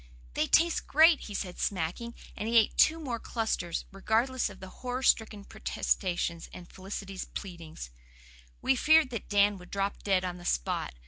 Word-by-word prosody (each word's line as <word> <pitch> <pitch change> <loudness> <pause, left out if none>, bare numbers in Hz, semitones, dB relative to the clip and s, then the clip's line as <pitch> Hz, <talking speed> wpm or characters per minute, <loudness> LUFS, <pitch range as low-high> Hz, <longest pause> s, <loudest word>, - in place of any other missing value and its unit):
"They - - 0
taste 335 0 +3
great," 315 +1 +6
he 205 - -7
said, 180 -2 -4
smacking; 200 +6 -2 0.2
and 215 - -3
he 235 - +4
ate 220 - +4
two 320 +1 +4
more 250 -7 -4
clusters, 220 -8 -2
regardless 225 +6 0
of 190 -2 -13
our - - -7
horror 250 +6 -5
stricken 215 -4 +2
protestations 175 -4 -2
and 175 -1 -11
Felicity's 195 0 -7
pleadings. 165 - -8 0.7
We 265 - +3
feared 310 0 +4
that 230 -4 -6
Dan 205 -1 +3
would 180 - -14
drop 200 0 -2
dead 190 -2 +1
on 180 -1 -4
the - - -12
spot. - - -1
205 Hz, 170 wpm, -29 LUFS, 185-240 Hz, 0.7 s, great